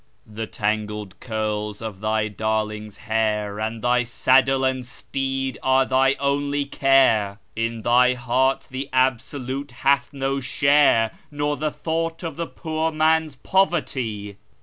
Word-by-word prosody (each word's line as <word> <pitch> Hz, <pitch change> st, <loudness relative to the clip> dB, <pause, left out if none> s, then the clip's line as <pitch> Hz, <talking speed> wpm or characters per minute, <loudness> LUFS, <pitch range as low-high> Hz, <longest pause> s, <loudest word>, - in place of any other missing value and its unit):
The 110 Hz, +1 st, -6 dB
tangled 105 Hz, -2 st, -3 dB
curls 105 Hz, -2 st, -3 dB
of 110 Hz, -4 st, -6 dB
thy 110 Hz, 0 st, 0 dB
darling's 110 Hz, -1 st, -3 dB
hair, 105 Hz, -2 st, 0 dB
and 110 Hz, +1 st, -3 dB
thy 125 Hz, 0 st, +3 dB
saddle 135 Hz, +3 st, +3 dB
and 130 Hz, -1 st, 0 dB, 0.3 s
teed 135 Hz, -1 st, -1 dB
are 130 Hz, 0 st, +3 dB
thy 135 Hz, +1 st, +3 dB
only 140 Hz, +1 st, 0 dB
care; 130 Hz, -8 st, +3 dB, 0.2 s
In 115 Hz, 0 st, -2 dB
thy 125 Hz, +2 st, +4 dB
heart 130 Hz, +2 st, 0 dB
the 135 Hz, +2 st, -5 dB
Absolute 130 Hz, +2 st, -1 dB
hath 140 Hz, +1 st, +3 dB
no 135 Hz, -1 st, -1 dB
share, 135 Hz, -3 st, +3 dB, 0.2 s
nor 145 Hz, 0 st, -1 dB
the 155 Hz, +1 st, -1 dB
thought 165 Hz, +2 st, -3 dB
of 165 Hz, -3 st, -4 dB
the 170 Hz, +1 st, -3 dB
poor 160 Hz, -1 st, -2 dB
man's 155 Hz, -1 st, +2 dB
poverty. 130 Hz, -, -1 dB
130 Hz, 130 wpm, -23 LUFS, 110-140 Hz, 0.3 s, thy